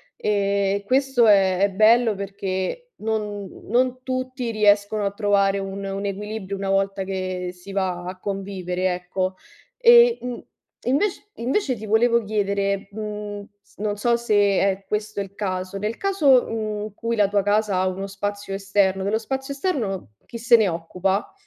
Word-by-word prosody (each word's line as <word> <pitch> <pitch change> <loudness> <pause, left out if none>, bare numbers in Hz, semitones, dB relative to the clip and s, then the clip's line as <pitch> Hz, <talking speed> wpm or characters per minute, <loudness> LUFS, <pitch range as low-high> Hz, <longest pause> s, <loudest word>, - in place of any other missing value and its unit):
e 200 -1 0
questo 260 -1 +3
è 190 -3 +4
è 200 - +4
bello 220 +2 +4
perché 195 - -4
non 210 -3 -3 0.2
non 255 +2 +1
tutti 255 -2 -3
riescono 210 -1 +3
a 200 - 0
trovare 200 -1 +2
un 195 0 -5
un 195 +1 -4
equilibrio 200 0 -4
una 195 0 -3
volta 195 0 +1
che 185 -1 -3
si 180 +2 -11
va 185 -2 -1
a 185 +1 -6
convivere, 185 -2 -2
ecco. 185 +1 -3 0.4
E, 475 -1 +7
mhmm, 245 -1 -5 0.4
invec 355 +11 0
invece 260 - 0
ti 215 -1 -8
volevo 230 +2 +3
chiedere, 200 -1 -1
mhmm, 210 -1 -5 0.2
s - - -28
non 205 0 -2
so 235 +3 +2
se 235 -3 0 0.2
è 195 0 0
questo 210 0 -3
il 195 0 -8
caso, 185 -1 -3
nel 210 +3 -3
caso, 300 -11 +4
mhmm, 215 -2 -3
in 210 -1 -7
cui 230 +2 -2
la 205 -2 +4
tua 200 -1 +1
casa 210 -1 +1
ha 185 0 +2
uno 195 +1 -3
spazio 200 +1 -4
esterno, 195 -1 +1
dello 205 +3 +1
spazio 265 +4 -4
esterno 240 - -2
chi 235 - -8
se 235 +1 +5
ne 220 -3 +3
occupa? 180 +4 -2
205 Hz, 160 wpm, -23 LUFS, 195-225 Hz, 0.4 s, E